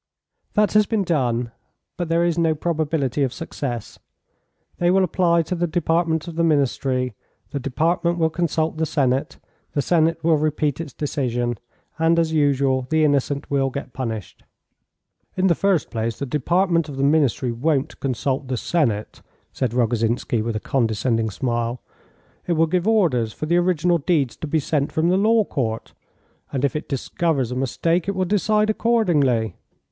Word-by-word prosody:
"That 210 0 +3
has 210 -1 +4
been 220 -3 0
done, 125 -8 0 0.4
but 175 -2 -4
there 165 +1 +2
is 170 -2 +1
no 165 -2 +2
probability 155 -4 -1
of 135 -3 +1
success. 130 -5 -5 0.8
They 175 - +3
will 190 +1 +4
apply 170 -1 +2
to 165 - -4
the 175 0 0
Department 165 0 0
of 165 -1 -7
the 170 - +2
Ministry, 135 -4 +1 0.4
the 140 - -2
Department 165 +6 0
will 160 -1 +1
consult 160 -1 -1
the 160 0 0
Senate, 135 -3 0 0.4
the 145 - +1
Senate 165 +2 +2
will 160 -1 +4
repeat 150 -1 0
its 155 -4 -7
decision, 120 -5 -2 0.4
and, 165 +1 +3
as 165 -1 +1
usual, 135 -3 +2
the 160 0 +2
innocent 140 0 0
will 135 -1 +2
get 135 -1 -7
punished." 115 -7 -5 1.0
"In 185 - +2
the 180 - +5
first 190 -1 +1
place, 115 0 -2
the 140 - -3
Department 165 +4 +1
of 140 - -7
the 135 - 0
Ministry 140 -4 +2
won't 135 +3 -1
consult 135 +1 -2
the 130 -1 -2
Senate," 115 - -1 0.3
said 130 -4 -1
Rogozhinsky, 120 -1 0
with 115 0 -2
a - - -1
condescending 115 -1 0
smile; 120 +2 -2 0.7
"it 175 - +2
will 165 0 +3
give 180 +4 0
orders 150 - +2
for - - -5
the 170 +3 +2
original 175 -1 +2
deeds 145 -6 0
to 155 - -5
be 160 +2 +1
sent 145 -1 -1
from 160 +2 +1
the 185 - +3
Law 220 +2 +4
Court, 115 -9 -3 0.6
and 135 0 0
if 140 - -1
it 150 - -4
discovers 140 -1 -1
a - - -3
mistake 165 +7 0
it 200 - -1
will 185 0 0
decide 210 +2 +2
accordingly. 150 - +2
150 Hz, 170 wpm, -22 LUFS, 130-170 Hz, 1.0 s, the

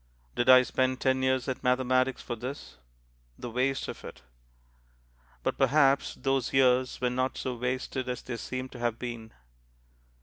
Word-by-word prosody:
Did 120 - 0
I 130 0 +9
spend 130 +1 0
ten 130 0 +1
years 130 0 +1
at 130 - -3
mathematics 130 +1 +1
for 120 - -4
this? 120 - -7 0.6
The 120 - -7
waste 130 +3 0
of - - -7
it! - - -10 1.2
But - - -2
perhaps 140 -2 +3
those 135 -1 -1
years 130 -1 +3
were 125 -1 0
not 130 +1 -1
so 130 - -3
wasted 125 +1 -3
as 125 - -4
they 120 -2 -5
seem 130 +2 -5
to 125 - -11
have 120 -1 -1
been. 120 -2 -6
130 Hz, 160 wpm, -29 LUFS, 125-130 Hz, 1.2 s, I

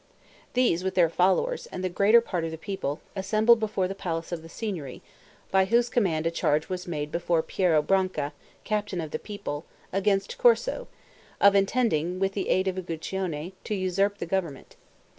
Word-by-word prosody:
These, 235 -9 +2
with 190 0 -2
their 170 -3 +4
followers, 470 - +1
and 185 - -6
the - - +1
greater 200 +6 +5
part 180 -7 -3
of 165 - -2
the 160 - -6
people, 165 -4 -4
assembled 215 +4 +4
before 210 -4 0
the 195 - -4
palace 170 -4 -4
of 170 -2 -3
the 165 - -12
Signory, 165 - -5 0.5
by 190 0 +4
whose 235 +4 +2
command 170 -10 +1
a 165 - +2
charge 155 -2 0
was 180 -1 -4
made 150 -3 -3
before 170 -1 +1
Piero 165 -5 +2
Branca, 185 -5 0 0.3
captain 205 -3 -2
of 160 -3 -4
the - - -3
people, 200 -8 -6 0.3
against 195 - 0
Corso, - - +3 0.5
of 200 0 +7
intending, 195 -5 +1
with 195 +1 +1
the 195 -2 -2
aid 185 +1 +2
of 190 0 -1
Uguccione, 175 -1 -4
to 210 - -2
usurp 195 +2 0
the - - -4
government. 170 -6 -3
185 Hz, 180 wpm, -27 LUFS, 165-205 Hz, 0.5 s, of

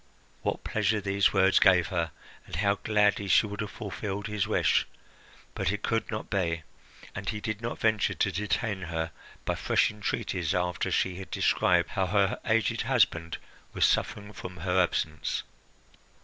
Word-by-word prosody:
What - - -2
pleasure 110 -1 +1
these 100 0 +2
words 95 -1 +4
gave 85 -3 +5
her, 85 -3 -1 0.4
and - - -6
how 100 +3 +2
gladly 105 -1 +2
she 95 - +5
would 105 0 -5
have 105 - -3
fulfilled 105 -2 -5
his 105 -2 -1
wish! - - +2 0.7
But - - 0
it 105 0 -4
could 115 0 0
not 110 -1 -4
be, 85 -5 -1 0.5
and 95 0 -4
he 105 - -2
did 110 0 -4
not 115 0 -3
venture 110 -2 +1
to - - +1
detain 105 0 -1
her 80 -1 -3 0.3
by - - +1
fresh - - +2
entreaties 95 -5 -2
after 90 0 0
she 90 -1 0
had 95 - -8
described 85 -1 +2
how 95 -3 0
her 100 0 +2
aged 110 -2 +2
husband 85 -2 +1 0.4
was - - +3
suffering 105 0 0
from 90 -1 -8
her 90 +2 +2
absence. 80 -3 -1
100 Hz, 165 wpm, -28 LUFS, 90-105 Hz, 0.7 s, gave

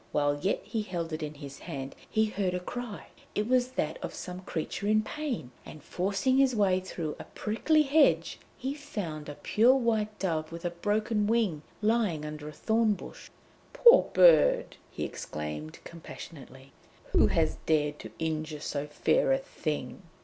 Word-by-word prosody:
While 145 0 +1
yet 195 - 0
he 225 - -2
held 170 -5 -4
it 155 - -3
in 150 0 -5
his 140 -2 -9
hand 135 0 -6
he 220 0 +2
heard 195 -4 -1
a - - -1
cry; 230 +3 -6 0.3
it 210 +1 0
was 255 0 +2
that 155 -8 -2
of - - -5
some 180 0 -6
creature 185 +3 -4
in 215 +1 +3
pain, 260 - -4
and 155 -2 -11
forcing 200 +8 0
his 270 -2 +4
way 190 -3 +3
through 165 -4 -5
a - - -6
prickly 305 +9 +1
hedge, 295 +1 +3 0.2
he 265 +2 -3
found 200 - -6
a 145 - -6
pure 235 - +4
white 220 -4 0
dove 160 -4 -2
with 170 +1 -7
a 175 - 0
broken 210 +4 0
wing 215 -9 +1 0.2
lying 210 -9 +1
under 150 0 -6
a - - -8
thornbush. 220 +6 -1 0.4
'Poor 485 0 +7
bird!' - - +5
he - - -5
exclaimed 75 0 -5
compassionately. 140 -5 -11 0.4
'Who - - +5
has - - +1
dared 150 -2 +1
to 110 - -9
injure 155 -1 -3
so 145 -1 -3
fair 150 - +2
a 270 - +4
thing?' 155 - -4
185 Hz, 165 wpm, -29 LUFS, 150-230 Hz, 0.4 s, Poor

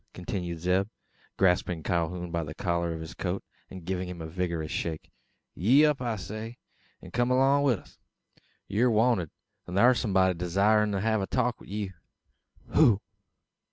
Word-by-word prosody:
continues 90 -2 -4
Zeb, 95 +3 +1 0.5
grasping 90 -3 +2
Calhoun 85 +1 -1
by 85 0 -1
the 80 0 -7
collar 85 -2 -1
of 80 -1 -5
his 80 - -8
coat, 95 +1 -3 0.3
and 95 -3 -10
giving 90 0 -2
him 90 -1 -7
a 80 - -5
vigorous 85 -1 -3
shake. 80 -2 -4 0.4
"Yee 130 - +5
up, 150 -3 +1
I 120 -3 -1
say; 110 +4 -7 0.5
an - - -10
kum 120 +1 +1
along 135 +2 +4
wi' 140 -3 +4
us! 105 - -10 0.7
Ye're 120 +5 +2
wanted. 110 -6 +2 0.4
Thar's 115 +7 +4
somebody 95 -4 +2
desirin' 100 +5 +2
to 95 - -1
have 110 -1 +1
a 95 - -2
talk 125 -2 0
wi' - - -13
you!" 100 -1 -4 0.8
"Who? 120 -10 +5
95 Hz, 160 wpm, -28 LUFS, 85-115 Hz, 0.8 s, Yee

